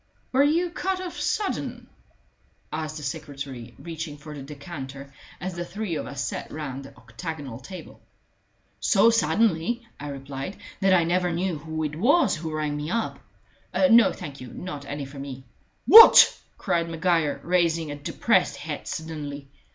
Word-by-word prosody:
"Were 265 - +4
you 330 +5 +2
cut 375 +1 -2
off 365 -2 -6
sudden?" 415 -2 -2 0.9
asked 155 0 -4
the 150 - -8
secretary, 135 -5 -6
reaching 165 -3 -6
for 150 +1 -10
the 145 - -8
decanter, 140 -1 -8 0.3
as 185 +2 -4
the 175 0 -4
three 200 +1 -4
of - - -3
us 140 -1 -4
sat - - -5
round 140 -3 -6
the 135 - -14
octagonal 125 +2 -7
table. 185 +8 -10 0.8
"So 225 +3 +5
suddenly," 225 +4 +1
I 145 - -6
replied, 140 +5 -6 0.2
"that 190 -1 +4
I 175 - +4
never 175 +1 +1
knew 170 -1 -1
who 160 +1 -4
it 150 -1 -3
was 255 - +3
who 160 0 -5
rang 150 -1 -2
me 150 +1 -4
up. 230 +4 -2 0.7
No, 230 -3 +7
thank 140 -2 -8
you 130 - -8
not 145 +2 -7
any 145 0 -4
for 135 +1 -10
me." 135 -1 -7 0.4
"What!" 455 +1 +10 0.2
cried 170 0 0
Maguire, 165 -2 +1
raising 170 -3 +1
a - - -4
depressed 145 0 +1
head - - -6
suddenly. 145 -3 -6
160 Hz, 160 wpm, -25 LUFS, 140-180 Hz, 0.9 s, What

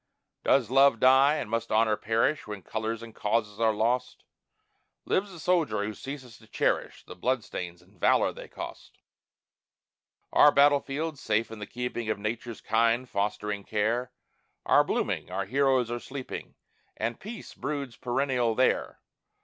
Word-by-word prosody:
Does 125 -4 +3
love 135 -3 +5
die, 135 +4 +6
and 155 - -3
must 115 +1 -2
honor 110 0 +3
perish 115 +8 0
When 105 -3 -7
colors 110 +2 -3
and 115 -1 -10
causes 105 -1 -1
are 115 -1 +4
lost? 120 +4 -1 0.8
Lives 195 +1 0
the 175 - -10
soldier 165 - +1
who 105 +1 -3
ceases 130 0 -8
to 110 - -19
cherish - - -1
The - - -10
blood 125 +5 0
stains 90 -3 -7
and - - -25
valor - - +3
they - - -10
cost? - - -9 1.4
Our 150 - +7
battle 145 0 +5
fields, 150 +2 -4
safe 110 +1 0
in 110 - -8
the 105 - -6
keeping 120 -2 -4
Of 110 - 0
Nature's 110 +2 -4
kind, 115 +3 +2
fostering 105 -1 -2
care, 115 +5 -1 0.5
Are - - +5
blooming, - - -2
our 95 +1 -2
heroes 130 0 +2
are 120 - -2
sleeping, 135 +1 -7 0.4
And 115 +2 -2
peace 220 +2 -8
broods 140 -4 -4
perennial 125 -2 0
there. 130 +2 +1
115 Hz, 155 wpm, -28 LUFS, 110-135 Hz, 1.4 s, Our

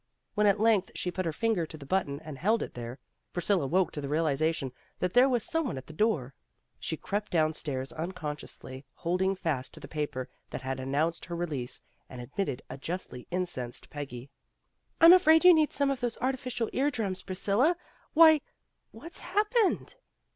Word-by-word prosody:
When 210 0 +3
at 200 +1 +4
length 215 -3 +3
she 180 - -2
put 185 -1 -2
her - - 0
finger 200 -1 0
to 155 - -9
the 140 - -10
button 140 -3 0
and 155 -4 -8
held 220 +5 +2
it - - -7
there, 120 +1 -6 0.4
Priscilla 175 -4 +1
woke 185 +4 +2
to 145 - -5
the 140 - -4
realization 155 -2 +1 0.3
that 180 0 -1
there 250 +2 +6
was 240 -4 +1
some 325 -3 0
one 230 - -3
at 130 - -7
the 155 - -11
door. 155 - +1 0.5
She 160 - -3
crept 205 +5 -3
downstairs, 155 -5 0
unconsciously 150 -5 -6
holding 185 +3 0
fast 140 -8 -2
to - - -11
the - - -9
paper 145 -5 -3 0.2
that - - -6
had 130 0 -3
announced 145 +6 -1
her 170 - -5
release, 150 -8 -3 0.3
and 125 - -9
admitted 135 +2 -3
a - - -8
justly 165 -6 -5
incensed 175 -10 -3
Peggy. 135 -3 -7 0.7
"I'm 335 +2 +10
afraid 320 -2 +6
you 360 - +11
need 310 -2 +3
some 280 -1 +1
of 270 - -2
those 240 -2 -2
artificial 255 -2 -2
ear 280 +3 +2
drums, 205 -8 -2
Priscilla 210 - +1 0.4
Why, 315 -2 +8 0.5
what's 340 +2 -8
hap 420 +1 0
pened?" 460 -2 +1
175 Hz, 185 wpm, -29 LUFS, 140-230 Hz, 0.7 s, you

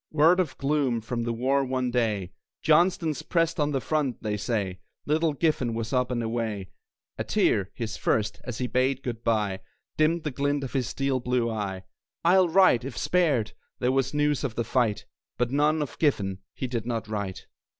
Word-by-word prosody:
Word 160 +4 +5
of 170 -7 -1
gloom 140 -4 +1
from 115 +1 -3
the 120 - 0
war 130 +4 +1
one 130 -1 -1
day: 105 -7 0 0.3
"Johnston's 160 -2 +3
pressed 165 -1 0
at 150 0 +2
the 135 - 0
front, 145 -3 -1
they 105 -1 -1
say!" 105 -4 -2 0.3
Little 155 +1 +2
Giffen 140 -6 0
was 115 +2 -3
up 125 -1 +2
and 120 -2 -1
away; 110 -4 -3 0.5
A - - 0
tear 100 -1 +1
his 115 -2 -4
first 105 -2 0
as 125 -4 -5
he 125 - -1
bade 130 +2 +1
good 120 -2 -4
by, 105 -4 +1 0.4
Dimmed 155 +2 +2
the 150 - -2
glint 145 +1 0
of 130 - -6
his 130 -4 0
steel 135 0 -1
blue 120 -1 0
eye. 100 -4 -3 0.4
"I'll 180 +1 +5
write, 175 -9 +5
if 130 -2 -6
spared!" 150 -12 +1 0.2
There 125 0 +1
was 135 0 +1
news 150 -1 +1
of 125 -5 -2
the 120 - 0
fight; 115 -2 0 0.3
But 120 0 0
none 150 +2 +2
of 145 - -9
Giffen 100 - +1 0.2
he - - -3
did 120 -2 -3
not 115 -3 -2
write. 100 -3 -4
125 Hz, 190 wpm, -27 LUFS, 115-150 Hz, 0.5 s, Word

